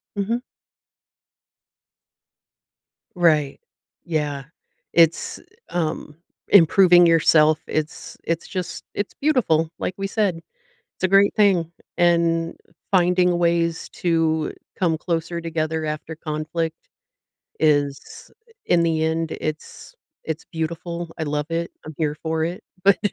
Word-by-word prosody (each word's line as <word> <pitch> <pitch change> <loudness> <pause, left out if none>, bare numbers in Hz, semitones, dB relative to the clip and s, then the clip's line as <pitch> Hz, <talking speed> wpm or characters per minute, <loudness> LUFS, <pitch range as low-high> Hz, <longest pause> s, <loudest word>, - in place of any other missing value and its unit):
Mhm. 225 +5 -1 2.7
Right. 155 -5 +2 0.4
Yeah. 150 -4 -2 0.5
It's, 165 -1 +3 0.3
um, 155 -3 -3 0.3
improving 175 -1 +7
yourself, 155 -1 +5
it's 155 0 -4
it's 165 0 -2
just 185 -2 -5
it's 205 - -3
beautiful. 185 - +1
Like 185 - -3
we 195 - -3
said, 200 -4 0 0.6
it's - - -6
a - - +4
great 195 +1 +5
thing, 185 -6 +3 0.2
and, 170 -1 +2 0.4
finding 180 -1 +3
ways 170 -1 +1
to 165 -2 0 0.2
come 165 -4 +1
closer 170 0 -2
together 160 -1 -2
after 155 +1 -5
conflict 160 +1 -3 0.9
is 145 -2 0 0.3
in 170 -1 +3
the 160 -1 +1
end, 160 0 -1
it's 155 - -6 0.3
it's 160 0 -5
beautiful, 170 +1 -4
I 160 - -2
love 150 0 -2
it, 170 +1 -1 0.2
I'm 155 - -8
here 150 -2 -1
for 160 0 0
it, 175 +2 -5 0.2
but 200 -2 +6
165 Hz, 110 wpm, -22 LUFS, 155-175 Hz, 2.7 s, improving